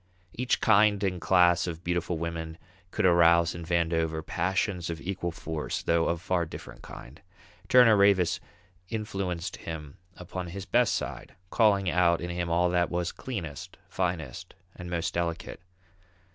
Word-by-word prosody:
Each 125 +1 0
kind 105 -2 +4
and 90 -3 -1
class 90 -2 +4
of 85 0 -6
beautiful 85 0 -1
women 80 0 -5 0.3
could - - -1
arouse 85 -1 +5
in 85 - -7
Vandover 80 -1 0
passions 95 -2 -1
of 85 -1 -4
equal 90 -1 -3
force, 80 -1 -4
though 85 0 +2
of 85 +1 -2
far 90 -2 +1
different - - -10
kind. 65 +5 -12 0.5
Turner 125 -4 +7
Ravis 100 -4 +3 0.5
influenced 95 -5 -3
him 75 -3 -8 0.2
upon 90 0 -6
his 95 +2 -7
best - - +2
side, - - -6 0.2
calling 100 -4 +3
out 85 -1 +3
in 85 +1 -4
him 85 0 -3
all 85 +1 +2
that 90 -1 +1
was 85 -1 -2
cleanest, 85 - -7
finest, 85 -8 -3 0.2
and 90 -1 -8
most 85 -1 -2
delicate. 85 0 -3
85 Hz, 145 wpm, -28 LUFS, 85-95 Hz, 0.5 s, Turner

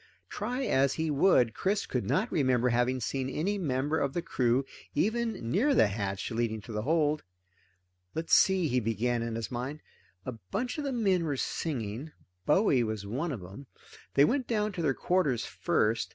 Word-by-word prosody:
Try 245 +6 -2
as 140 - +2
he 160 -1 -1
would, 135 - +4
Chris 200 - 0
could - - -2
not 230 - +1
remember 130 -5 +2
having 125 +2 +1
seen 130 +2 -2
any 195 +9 -1
member 145 -1 0
of 140 -1 -1
the 175 - -2
crew 125 +1 +1 0.3
even 220 - 0
near 270 - +3
the - - +6
hatch 100 -1 -3
leading 115 -1 -1
to 115 - -10
the 105 -1 -2
hold. 150 +3 +1 0.9
Let's 160 +1 -2
see, 190 -3 +5
he 125 -2 +1
began 115 +1 0
in 115 -1 -3
his 115 -1 -4
mind, 130 +5 -4 0.4
a - - -3 0.2
bunch 245 +7 -2
of 295 - -3
the 275 - -1
men 195 -8 +2
were 145 -4 -1
singing 130 -1 -3 0.4
Bowie 150 - +4
was 110 -2 -3
one 135 +11 -2
of 115 -9 -5
'em. 100 +10 -10 0.5
They 140 - +7
went 260 - 0
down 215 -2 0
to 180 -3 -4
their 140 -5 +1
quarters 165 -10 +1
first. 110 -2 0
140 Hz, 180 wpm, -30 LUFS, 120-185 Hz, 0.9 s, They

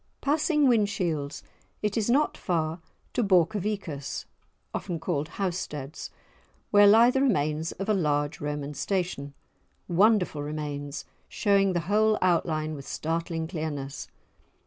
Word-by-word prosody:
Passing 300 +1 +2
Whinshields, 185 - 0 0.4
it 210 -1 0
is 220 0 0
not 285 +5 +3
far 165 -2 -1 0.3
to - - +1
Borcovicus 185 -5 0 0.5
(often 175 -4 -3
called 155 -3 -1
Housteads) 165 -6 -4 0.6
where 205 0 +7
lie 225 +4 +7
the 265 - +1
remains 160 - +1
of 195 - -5
a 215 - +3
large 145 -4 0
Roman 145 0 -3
Station, 145 -3 -2 0.5
wonderful 185 -4 +3
remains, 145 -1 -5 0.2
showing 200 -2 +2
the 175 - 0
whole 215 +5 +3
outline 160 -3 +1
with 140 -2 -8
startling 165 0 -2
clearness. 150 -5 -4
170 Hz, 120 wpm, -27 LUFS, 150-205 Hz, 0.6 s, where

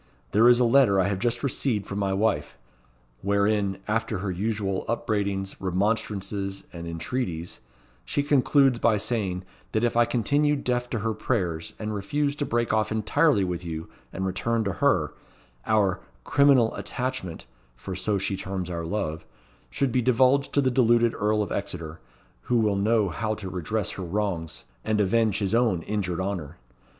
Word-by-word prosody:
There 115 +4 +6
is 120 0 +6
a - - +4
letter 120 -5 +5
I 95 - +3
have 95 -2 -2
just 120 +3 -1
received 120 -6 0
from 100 0 -4
my 100 -1 0
wife; 95 - 0 0.6
wherein, 100 0 +1
after 110 0 0
her 95 +1 -3
usual 100 0 -2
upbraidings, 100 -4 -1
remonstrances, 100 0 -1
and 85 -1 -7
entreaties, 85 0 -4 0.4
she 145 - -1
concludes 140 -3 +3
by 110 -2 +3
saying, 100 -4 -2 0.3
that 110 - +1
if 120 - +1
I 120 0 +5
continue 145 +6 +2
deaf 125 -3 -1
to 120 - -2
her 110 +1 0
prayers, 95 -7 -2
and 110 0 -4
refuse 140 +8 -1
to 145 - -2
break 120 0 0
off 110 -1 +1
entirely 110 +3 +2
with 90 -1 -3
you, 80 -1 -5 0.2
and 95 - -3
return 110 +5 0
to 100 -3 -1
her, - - +2 0.5
our 100 -4 +2 0.2
'criminal 140 - +4
attachment,' 125 -9 -4 0.3
for 90 +10 -6
so 105 +2 0
she 95 0 -1
terms 95 -2 -4
our 85 -1 -3
love 80 -5 -2 0.5
should 135 - 0
be 125 - +2
divulged 130 +3 +3
to 140 - +4
the 130 -2 +2
deluded 120 -2 +4
Earl 105 0 +1
of - - -7
Exeter, 85 -5 -4 0.5
who 120 - +3
will 105 -3 +2
know 105 0 +2
how 110 +7 -2
to 95 -3 -7
redress 95 +4 -2
her 95 - -6
wrongs, 85 -3 -3 0.2
and 110 -1 0
avenge 105 +1 +2
his 100 0 -1
own 115 -8 +2
injured 95 -5 -2
honour. 90 -5 -4
105 Hz, 165 wpm, -26 LUFS, 95-120 Hz, 0.6 s, There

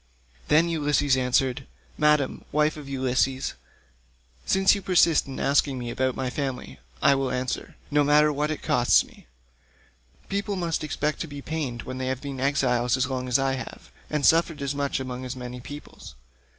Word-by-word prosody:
Then 160 +3 +4
Ulysses 145 -4 +2
answered, 130 +1 0 0.3
"Madam, 150 -3 +2
wife 150 +1 +2
of 145 -3 -9
Ulysses, 130 - 0 0.9
since 190 0 +4
you 200 - -2
persist 170 -6 +3
in 135 - -6
asking 140 -1 +2
me 120 -1 -4
about 130 +1 0
my 130 -1 -2
family, 135 - -4 0.2
I 140 - +6
will 135 -1 0
answer, 125 0 -3 0.2
no 145 0 +4
matter 150 +1 +4
what 150 +1 -1
it 155 - -4
costs - - +4
me: - - -19 1.0
people 200 0 -2
must 170 -4 -2
expect 150 0 -2
to 165 - -3
be 145 -1 -8
pained 140 -7 -4
when 130 0 -6
they 130 - -2
have 130 -1 -2
been 140 -1 -6
exiles 130 -3 +1
as 130 - +1
long 130 -1 -3
as 125 +1 +3
I 135 -1 +1
have, 130 - -8 0.2
and 150 -2 0
suffered 165 -3 +3
as 140 0 -1
much 140 -1 -1
among 130 -1 -5
as 130 0 -5
many 125 0 -7
peoples. 145 +4 -10
140 Hz, 175 wpm, -25 LUFS, 130-150 Hz, 1.0 s, I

